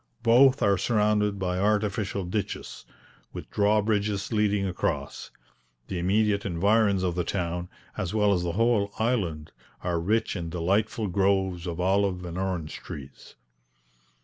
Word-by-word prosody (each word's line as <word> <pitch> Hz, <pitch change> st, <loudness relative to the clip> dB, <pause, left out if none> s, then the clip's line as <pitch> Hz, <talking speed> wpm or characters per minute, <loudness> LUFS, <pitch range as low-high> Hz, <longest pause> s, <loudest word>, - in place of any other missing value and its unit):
Both 125 Hz, +3 st, +5 dB
are 100 Hz, -3 st, +3 dB
surrounded 105 Hz, -1 st, +1 dB
by 90 Hz, -1 st, -2 dB
artificial 100 Hz, -1 st, 0 dB
ditches, 100 Hz, +4 st, -4 dB, 0.5 s
with -, -, -8 dB
draw 105 Hz, +1 st, +2 dB
bridges 105 Hz, -1 st, -1 dB
leading 105 Hz, -2 st, +1 dB
across. 90 Hz, -2 st, -3 dB, 0.6 s
The 90 Hz, -, -3 dB
immediate 100 Hz, +3 st, +1 dB
environs 100 Hz, +2 st, +2 dB
of 90 Hz, -2 st, 0 dB
the 90 Hz, 0 st, -1 dB
town, 85 Hz, -1 st, -3 dB, 0.3 s
as 90 Hz, -, -2 dB
well 105 Hz, -2 st, +3 dB
as 90 Hz, -, 0 dB
the 85 Hz, -1 st, -2 dB
whole 110 Hz, -1 st, +2 dB
island, 95 Hz, -10 st, -1 dB, 0.3 s
are 90 Hz, -2 st, 0 dB
rich 110 Hz, +7 st, 0 dB
in 85 Hz, -3 st, -4 dB
delightful 100 Hz, +6 st, 0 dB
groves 95 Hz, -2 st, 0 dB
of 85 Hz, 0 st, -4 dB
olive 95 Hz, 0 st, +1 dB
and 85 Hz, -1 st, -6 dB
orange 90 Hz, -5 st, -3 dB
trees. 70 Hz, -2 st, -10 dB
100 Hz, 140 wpm, -26 LUFS, 90-105 Hz, 0.6 s, Both